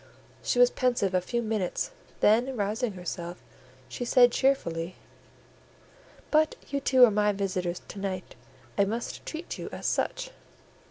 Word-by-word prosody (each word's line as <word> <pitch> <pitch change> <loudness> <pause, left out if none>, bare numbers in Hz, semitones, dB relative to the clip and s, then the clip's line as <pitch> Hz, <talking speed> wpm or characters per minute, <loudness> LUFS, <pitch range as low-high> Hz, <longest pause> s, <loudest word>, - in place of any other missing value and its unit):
She - - -1
was 245 0 +6
pensive 240 -7 +1
a 185 - +3
few 235 +6 -2
minutes, 215 - -1 0.3
then 240 +5 +3
rousing 215 +3 -1
herself, 175 -1 -6 0.4
she - - -5
said 245 0 +6
cheerfully— 180 -12 0 1.4
"But 310 0 +3
you 280 - -1
two 260 -2 +6
are 230 - +2
my 210 0 +3
visitors 185 -3 -2
to 200 - -7
night; 190 -2 -4 0.5
I - - +7
must 230 +4 -4
treat 325 +2 -5
you - - -5
as - - -7
such." - - -1
215 Hz, 145 wpm, -28 LUFS, 185-250 Hz, 1.4 s, I